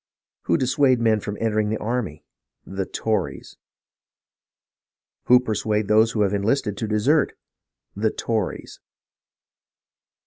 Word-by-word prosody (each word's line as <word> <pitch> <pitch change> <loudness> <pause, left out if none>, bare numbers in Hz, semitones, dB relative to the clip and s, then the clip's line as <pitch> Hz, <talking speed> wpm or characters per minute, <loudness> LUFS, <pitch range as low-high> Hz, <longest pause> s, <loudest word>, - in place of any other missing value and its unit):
Who 85 - +2
dissuade 130 -1 +2
men 110 -2 +2
from 105 0 -5
entering 110 -2 0
the 110 - -1
army? 110 -10 -3 0.4
The 95 0 -4
Tories! 110 -1 -3 1.7
Who 125 0 +7
persuade 105 -3 -1
those 110 +1 +4
who 110 - 0
have 100 0 0
enlisted 105 +1 0
to 110 - -3
desert? 125 +8 +1 0.6
The 110 +2 +1
Tories 110 -3 -3
110 Hz, 110 wpm, -23 LUFS, 105-120 Hz, 1.7 s, Who